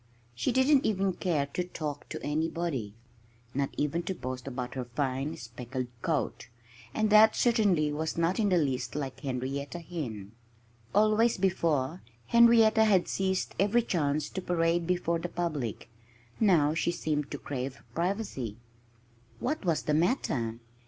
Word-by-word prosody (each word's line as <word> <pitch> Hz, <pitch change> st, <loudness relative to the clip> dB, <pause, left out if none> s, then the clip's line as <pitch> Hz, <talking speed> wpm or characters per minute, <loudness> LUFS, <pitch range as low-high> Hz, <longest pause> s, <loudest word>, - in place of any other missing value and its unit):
She 120 Hz, 0 st, 0 dB
didn't 265 Hz, +1 st, +4 dB
even 195 Hz, -2 st, +1 dB
care 160 Hz, -6 st, 0 dB
to 180 Hz, -, 0 dB
talk 150 Hz, -5 st, -6 dB
to -, -, -5 dB
anybody 155 Hz, -8 st, -2 dB, 0.6 s
not 140 Hz, 0 st, 0 dB
even 150 Hz, +4 st, 0 dB
to 190 Hz, +2 st, -4 dB
boast 130 Hz, -3 st, -6 dB
about 125 Hz, -1 st, -4 dB
her 130 Hz, -2 st, -4 dB
fine, 135 Hz, +4 st, -2 dB
speckled 125 Hz, +2 st, -6 dB
coat. -, -, -1 dB, 0.4 s
And 215 Hz, -, 0 dB
that 215 Hz, +1 st, +7 dB
certainly 200 Hz, -11 st, +3 dB
was 160 Hz, +2 st, -3 dB
not 170 Hz, +5 st, +1 dB
in 210 Hz, -2 st, +3 dB
the 180 Hz, -, +3 dB
least 140 Hz, -6 st, -1 dB
like 135 Hz, -3 st, -4 dB
Henrietta 135 Hz, +3 st, -3 dB
Hen. 125 Hz, -, -6 dB, 0.6 s
Always, 215 Hz, +2 st, +4 dB
before, 170 Hz, -5 st, 0 dB, 0.2 s
Henrietta 230 Hz, -, +6 dB
had 195 Hz, -5 st, +3 dB
seized 190 Hz, -1 st, -1 dB
every 210 Hz, +5 st, +3 dB
chance 150 Hz, -7 st, 0 dB
to 190 Hz, -, -4 dB
parade 170 Hz, -1 st, +1 dB
before 175 Hz, -2 st, 0 dB
the 175 Hz, -, -4 dB
public. 155 Hz, -, -3 dB, 0.5 s
Now 165 Hz, -9 st, +4 dB
she 165 Hz, -, 0 dB
seemed 150 Hz, -4 st, -2 dB
to -, -, -4 dB
crave 135 Hz, -1 st, -5 dB
privacy. 170 Hz, -, -2 dB, 0.8 s
What 300 Hz, +1 st, -2 dB
was 170 Hz, -4 st, +1 dB
the 150 Hz, -, 0 dB
matter? 140 Hz, -, 0 dB
165 Hz, 145 wpm, -29 LUFS, 135-190 Hz, 0.8 s, that